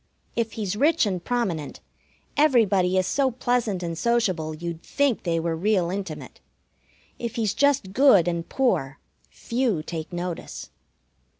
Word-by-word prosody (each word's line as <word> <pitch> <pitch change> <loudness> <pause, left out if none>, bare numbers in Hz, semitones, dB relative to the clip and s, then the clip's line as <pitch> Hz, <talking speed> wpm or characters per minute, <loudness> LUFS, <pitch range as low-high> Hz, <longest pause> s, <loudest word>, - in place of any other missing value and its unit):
If 230 -2 -1
he's 205 -3 -3
rich 300 +5 +3
and 185 -4 -2
prominent, 190 - -2 0.6
everybody 205 -11 +3
is 185 - +2
so 270 +7 +1
pleasant 240 -6 -1
and 170 -1 -3
sociable 185 -8 0
you'd 170 0 -6
think 280 +1 0
they 165 -2 0
were 165 0 -1
real 180 0 +1
intimate. 195 0 -6 0.8
If 235 0 -4
he's 220 -4 0
just 275 -9 +2
good 220 - +6
and 170 -1 -2
poor, 160 - 0 0.3
few 230 -9 -1
take 160 +1 -6
notice. 175 -1 -5
195 Hz, 135 wpm, -25 LUFS, 170-240 Hz, 0.8 s, good